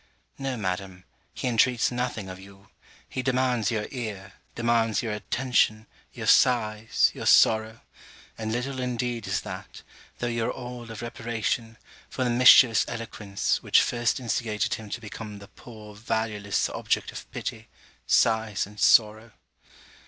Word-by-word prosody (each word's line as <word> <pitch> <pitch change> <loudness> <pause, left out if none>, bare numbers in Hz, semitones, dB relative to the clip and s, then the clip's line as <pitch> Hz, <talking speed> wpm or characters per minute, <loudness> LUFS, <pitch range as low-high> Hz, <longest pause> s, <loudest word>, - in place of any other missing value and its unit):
No, 135 -2 -3
Madam; 95 -2 -4 0.3
he - - -4
intreats 120 +1 +2
nothing 120 -5 -3
of 95 0 -8
you: 100 0 -16 0.4
he 130 - -4
demands 125 -3 +1
your 110 -3 -1
ear, 105 -6 -6 0.2
demands 115 -1 +1
your 110 -2 -2
attention, 110 -1 0 0.3
your - - -7
sighs, 110 -3 +3
your - - -5
sorrow: 110 0 +4 0.5
and 110 -1 -4
little 130 +3 -3
indeed 120 -2 -3
is - - -1
that, - - -9 0.3
though - - -3
your 115 -1 -1
all 125 -2 -7
of 115 +1 -7
reparation, 115 0 -3 0.3
for 130 - -2
the 125 - +1
mischievous 120 -2 +7
eloquence, 110 -4 -3
which - - +4
first 120 +1 0
instigated 110 -3 -1
him 110 -2 -6
to 115 - -4
become 105 -1 -8
the 100 0 -13
poor 110 -3 -13
valueless 110 -2 -1
object - - -1
of - - -9
pity, - - -6 0.4
sighs, 110 -3 +2
and 105 +1 -14
sorrow. 110 0 +4
115 Hz, 140 wpm, -26 LUFS, 105-120 Hz, 0.5 s, mischievous